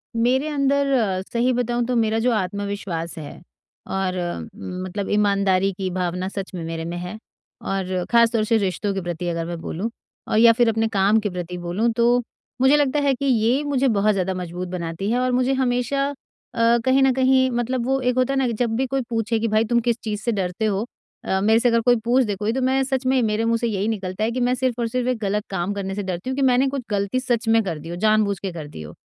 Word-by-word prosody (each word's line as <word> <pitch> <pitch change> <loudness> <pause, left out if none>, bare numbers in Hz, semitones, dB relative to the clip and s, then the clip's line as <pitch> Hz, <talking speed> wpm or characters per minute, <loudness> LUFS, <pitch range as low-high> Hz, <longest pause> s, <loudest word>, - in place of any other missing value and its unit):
मेरे 255 +5 +2
अंदर 280 -1 +1
अ, 195 -7 +1
सही 245 +2 +2
बताऊँ 240 0 0
तो 250 0 -1
मेरा 225 -1 +2
जो 245 +2 +2
आत्मविश्वास 200 -4 -3
है, 150 +1 -9 0.5
और 190 -1 -2
उम, 185 +1 -5
मतलब 190 +2 -4
ईमानदारी 200 -2 +2
की 190 -1 -2
भावना 180 0 -2
सच 195 -1 -6
में 170 - -5
मेरे 165 0 -4
में 170 +1 -4
है, 180 +4 -6 0.4
और 185 -2 -2
खास 235 -1 +5
तौर 225 -2 +1
से 225 +1 +2
रिश्तों 200 0 -1
के 195 - -3
प्रति 175 0 -4
अगर 165 -1 -2
मैं 170 -1 -5
बोलूँ 200 +8 -3 0.4
और - - 0
या 230 0 +8
फिर 235 0 +3
अपने 225 0 +1
काम 205 +1 +3
के 205 -1 -2
प्रति 180 0 -5
बोलूँ 175 +7 -1
तो 240 +1 +3 0.4
मुझे 265 +3 +6
लगता 290 0 +2
है 280 -1 +3
कि 280 - -4
ये 250 +2 +2
मुझे 275 -2 +1
बहुत 210 -2 +3
ज़्यादा 190 -1 -1
मजबूत 180 0 -5
बनाती 175 +2 -4
है, 245 - +1
और 255 0 +1
मुझे 255 +2 +2
हमेशा, 260 +2 0
अ, 235 -4 -1
कहीं 265 +1 +4
न 265 - +5
कहीं 260 0 +3
मतलब 240 +1 -1
वो 270 +1 +1
एक 250 0 +1
होता 255 +2 +2
है - - 0
ना, 260 - +2
कि 235 - -1
जब 225 0 -1
भी 265 +2 +1
कोई 270 +1 -1
पूछे 225 0 0
कि 230 - 0
भाई 215 +1 +2
तुम 235 +1 +2
किस 235 - +1
चीज़ 210 -2 -3
से 235 - 0
डरते 190 +1 -2
हो? 205 +1 0 0.4
अ, 190 - 0
मेरे 220 +2 +4
से 245 - +3
अगर 230 0 +2
कोई 245 +1 +4
पूछ 250 +2 +4
दे 205 -2 -2
कोई, 210 +3 -1
तो 265 - -1
मैं 265 +1 +2
सच 265 -1 -2
में 260 -1 +3
मेरे 220 +1 0
मुँह 230 0 +2
से 235 0 -1
यही 205 -1 -1
निकलता 195 -2 -3
है 225 - +1
कि 255 - -3
मैं 245 +1 +2
सिर्फ़ 250 -1 -1
और 230 - 0
सिर्फ़ 250 +1 -2
एक 250 - 0
गलत 205 0 -1
काम 190 +1 -2
करने 195 -1 -4
से 205 - -3
डरती 185 +5 -4
हूँ 260 - -2
कि - - 0
मैंने 260 +2 +3
कुछ 275 -1 -3
गलती 200 +5 0
सच 240 -3 -1
में 225 0 +4
कर 165 -5 -4
दी 165 - -9
हो, 175 - -4
जानबूझकर 200 -2 +1
कर 155 -3 -7
दी 145 - -10
हो। 75 -1 -9
220 Hz, 250 wpm, -22 LUFS, 190-245 Hz, 0.5 s, या